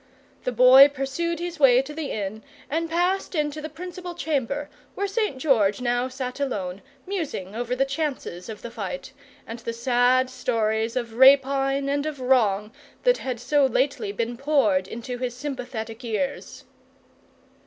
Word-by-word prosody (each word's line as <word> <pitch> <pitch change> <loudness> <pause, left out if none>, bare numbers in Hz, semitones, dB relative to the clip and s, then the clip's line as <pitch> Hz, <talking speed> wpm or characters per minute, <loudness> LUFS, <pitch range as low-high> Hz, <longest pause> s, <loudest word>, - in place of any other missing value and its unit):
The 250 - 0
Boy 255 +3 +8
pursued 290 +5 -3
his 345 -2 -5
way 260 -2 +6
to 295 +2 -8
the 305 -2 -4
inn, 210 +1 -4 0.3
and 330 +2 -1
passed 355 +3 0
into 300 0 -1
the 310 - -5
principal 355 +2 -8
chamber, 290 -3 -2 0.3
where 405 - -1
St. 400 - -1
George 225 -8 +2
now 245 0 0
sat 255 0 -5
alone, 200 -9 -3 0.2
musing 310 - -4
over 240 +1 -2
the 270 +2 +2
chances 270 - -4
of 215 - -8
the 235 - -6
fight, - - -6 0.3
and 230 +1 -7
the 230 0 -4
sad 245 +2 +3
stories 225 -3 -1
of 235 -3 -3
rapine 275 +1 +5
and 285 +2 0
of 300 -3 -5
wrong 220 -5 +2 0.3
that - - +3
had 255 -3 -4
so 290 +4 +2
lately 260 -4 0
been 230 +3 -3
poured 250 -10 +2
into 240 +3 -6
his 250 -1 -3
sympathetic 250 -4 -6
ears. 245 +5 -3
260 Hz, 155 wpm, -24 LUFS, 230-295 Hz, 0.3 s, Boy